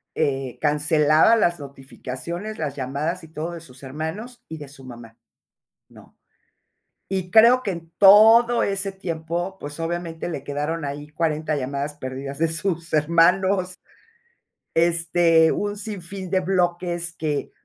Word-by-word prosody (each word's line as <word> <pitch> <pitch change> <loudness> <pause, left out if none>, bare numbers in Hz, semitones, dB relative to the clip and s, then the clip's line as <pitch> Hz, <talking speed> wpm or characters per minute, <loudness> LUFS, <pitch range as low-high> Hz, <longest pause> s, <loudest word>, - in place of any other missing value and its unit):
eh, 135 -4 -1
cancelaba 150 +5 +4
las 175 -6 +1
notificaciones, 140 - -7
las 145 -3 -4
llamadas 145 +7 -3
y - - -11
todo, 160 +2 -5
de 170 - -7
sus 130 -4 -15
hermanos 160 - -6
y 160 - -7
de 145 - -9
su 135 -1 -15
mamá, 115 -2 -12 0.7
¿no? - - -18 0.9
Y 185 -2 -3
creo 235 +5 +6
que, 205 - -2
en 165 -2 -7
todo 225 +4 +7
ese 195 0 -2
tiempo, 175 0 -4
pues, 145 +1 -7
obviamente, 165 0 -4
le 140 -5 -5
quedaron 150 +3 -3
ahí, 145 +1 -6
40 155 -1 -1
llamadas 140 +2 -3
perdidas 135 0 -7
de 165 +1 +2
sus 165 +1 -3
hermanos, 180 +4 +2 1.0
este, 165 -1 +3
un 205 0 -2
sinfín 195 -3 -4
de 190 0 +2
bloques 175 -2 -1
que 150 -2 -3
165 Hz, 135 wpm, -23 LUFS, 145-185 Hz, 1.0 s, todo